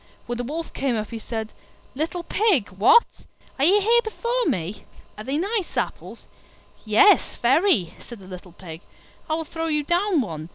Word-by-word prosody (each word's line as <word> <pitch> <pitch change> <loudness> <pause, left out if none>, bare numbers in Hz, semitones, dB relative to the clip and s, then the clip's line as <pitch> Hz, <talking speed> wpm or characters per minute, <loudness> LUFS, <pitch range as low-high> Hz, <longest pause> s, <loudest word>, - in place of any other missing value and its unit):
When 240 0 -5
the - - -2
Wolf 320 +6 -5
came 265 -3 -1
up 215 -1 -4
he 230 - -5
said, 220 -1 -6 0.4
"Little 325 +5 -3
Pig, 375 - +1
what! 210 - +5 0.5
are 275 - +3
you 390 +5 +5
here 465 +4 +4
before 475 +2 -2
me? 185 +3 -3 0.3
Are 215 - -8
they 270 +5 -2
nice 395 +2 -2
apples?" - - -4 0.6
"Yes, 220 - +4
very," 250 - +3
said 240 - -10
the 195 - -14
little 180 -1 -11
Pig; 165 -2 -10 0.5
"I 310 - +1
will 325 0 -4
throw 325 +1 -4
you 300 -2 0
down 345 +1 +1
one." 160 -7 -6
275 Hz, 175 wpm, -23 LUFS, -, 0.6 s, what